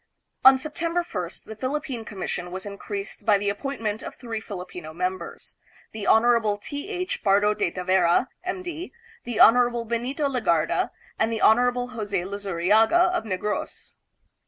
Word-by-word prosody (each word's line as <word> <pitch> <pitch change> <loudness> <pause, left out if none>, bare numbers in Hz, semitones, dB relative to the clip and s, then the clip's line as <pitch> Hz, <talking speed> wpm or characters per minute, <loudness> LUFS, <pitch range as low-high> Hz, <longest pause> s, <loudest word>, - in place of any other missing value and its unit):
On 265 0 +9
September 335 +5 -2
1st, 180 - -5
the 220 - -9
Philip 265 +6 -2
pine 240 -4 -5
Commission 180 -3 -4
was 185 +2 -6
increased 200 0 -6
by 210 -2 +4
the 200 0 -1
appointment 220 -1 -3
of - - -8
three 230 -3 -5
Filipino 180 -6 -8
members, 180 0 -4 0.3
the 215 -2 -5
Hon. 225 -2 +4
T. 285 - -6
H. 365 -2 -3
Pardo 205 +1 +4
de 190 - 0
Tavera, 180 +4 +2 0.2
M. 365 0 -3
D., 350 0 -6 0.3
the 240 -2 -3
Hon. 240 0 +5
Benito 250 +6 -1
Legarda, 185 - +1 0.3
and 220 +1 +2
the 225 - -2
Hon. 245 +2 +4
Jose 210 -5 -3
Luzu 200 0 -5
riaga 220 - +4
of 225 - -2
Negros. 210 +1 -4
220 Hz, 155 wpm, -25 LUFS, 195-255 Hz, 0.3 s, On